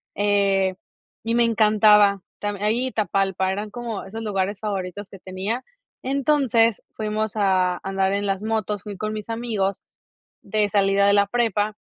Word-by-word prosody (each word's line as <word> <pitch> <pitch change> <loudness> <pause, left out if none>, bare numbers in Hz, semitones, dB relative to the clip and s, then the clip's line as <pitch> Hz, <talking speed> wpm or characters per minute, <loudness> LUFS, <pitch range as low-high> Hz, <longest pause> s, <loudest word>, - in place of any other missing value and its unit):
eh, 200 -2 +2 0.5
y 230 +1 -1
me 240 0 +4
encantaba. 210 -2 +4 0.2
Tam 205 -1 -3
Ahí 225 +5 +1
y - - -5
Tapalpa, 195 -3 0
eran 205 +2 -4
como 235 -3 -5
esos 220 +4 -7
lugares 200 -2 -2
favoritos 200 -2 -4
que 195 - -12
tenía. 190 +7 -4 0.4
Entonces 260 -5 +2
fuimos 215 0 -3
a 185 -3 +2
andar 195 0 0
en 200 0 -1
las 195 +1 -2
motos, 215 -3 -2
fui 210 -2 -7
con 215 +2 -3
mis 215 0 -7
amigos 220 -4 -2 0.6
de 210 -1 0
salida 200 -1 +3
de 200 - +5
la 200 0 +4
prepa. 215 -2 0
205 Hz, 155 wpm, -23 LUFS, 195-220 Hz, 0.6 s, de